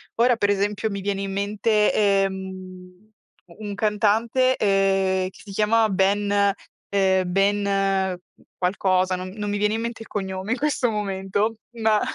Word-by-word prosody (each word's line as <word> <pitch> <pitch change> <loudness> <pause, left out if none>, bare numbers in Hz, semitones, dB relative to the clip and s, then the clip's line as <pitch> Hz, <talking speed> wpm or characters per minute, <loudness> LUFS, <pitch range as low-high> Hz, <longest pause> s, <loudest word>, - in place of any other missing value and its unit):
Ora 240 +1 +4
per 205 -3 +1
esempio, 205 +2 -1
mi 200 0 -4
viene 195 0 -2
in 195 - -4
mente, 210 +2 +1
ehm, 190 -1 -2 0.4
un 205 +4 -8
cantante, 220 +5 +2
ehm, 195 -2 +1
che - - -19
si 205 - -11
chiamava 215 +2 +2
Ben 200 +1 +2 0.4
ehm, 190 -1 +2
Ben, 195 -1 +1 0.4
qualcosa, 185 0 +1
non 185 0 -6
non 210 -1 -4
mi 205 - -1
viene 210 +1 +1
in 225 - -2
mente 235 0 -5
il - - -17
cognome 190 0 -4
in 255 - +1
questo 275 -3 0
momento, 205 +1 -1 0.3
ma 215 -1 +3
200 Hz, 150 wpm, -23 LUFS, 190-210 Hz, 0.4 s, Ora